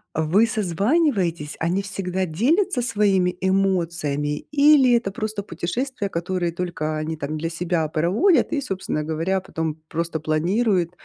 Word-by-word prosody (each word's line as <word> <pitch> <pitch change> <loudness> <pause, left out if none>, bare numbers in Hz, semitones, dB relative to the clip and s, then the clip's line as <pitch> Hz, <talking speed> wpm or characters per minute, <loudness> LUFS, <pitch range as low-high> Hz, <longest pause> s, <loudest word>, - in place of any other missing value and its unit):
э, 160 - +1
вы 185 +9 +4
созваниваетесь? 195 - 0
Они 175 +4 0
всегда 190 -1 -3
делятся 255 - +1
своими 200 -6 +1
эмоциями? 170 -6 0
Или 285 -3 +6
это 230 -5 0
просто 215 0 -4
путешествия, 205 - -3
которые 175 0 -2
только 165 -3 -3
они 155 +1 -3
там 150 +1 -4
для 165 +2 -2
себя 170 -1 -1
проводят 185 - +2
и, 285 - 0
собственно 190 - -3
говоря, 165 +5 -1
потом 160 -4 -3
просто 165 0 -3
планируют, 175 +4 +1
180 Hz, 135 wpm, -23 LUFS, 160-210 Hz, -, Или